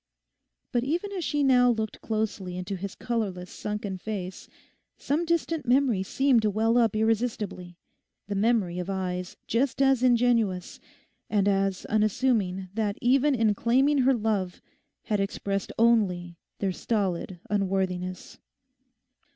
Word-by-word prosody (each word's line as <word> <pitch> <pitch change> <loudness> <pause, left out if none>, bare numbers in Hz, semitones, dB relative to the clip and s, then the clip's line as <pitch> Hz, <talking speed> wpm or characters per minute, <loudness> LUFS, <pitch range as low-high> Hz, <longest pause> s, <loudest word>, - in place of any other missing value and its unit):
But 240 -2 +1
even 345 +9 -2
as 375 -3 -3
she 295 -1 0
now 250 -2 +5
looked 220 -2 -2
closely 210 -5 -3
into 185 +2 -4
his 195 +1 -6
colourless 195 -7 -3
sunken 210 -2 -4
face 190 -3 -6 0.5
some 310 +5 -1
distant 330 -4 -1
memory 250 -5 +3
seemed 260 +5 +2
to 215 - +1
well 220 +3 +1
up 225 -3 +2
irresistibly—the 210 -4 -3
memory 200 -4 +1
of 180 +1 -4
eyes 180 -2 -3
just 250 +4 0
as 270 -2 +4
ingenuous, 235 -7 +2 0.5
and 205 -2 +2
as 195 -1 +1
unassuming 210 -4 +1
that 210 -2 -1
even 270 +3 +3
in 220 -3 +3
claiming 265 +7 +2
her 260 +1 +4
love 210 -5 -1 0.4
had 210 -3 -1
expressed 195 0 -2
only 185 -7 +2 0.2
their 195 -2 -1
stolid 185 -3 -2
unworthiness. 185 -2 -2
215 Hz, 125 wpm, -27 LUFS, 190-245 Hz, 0.5 s, now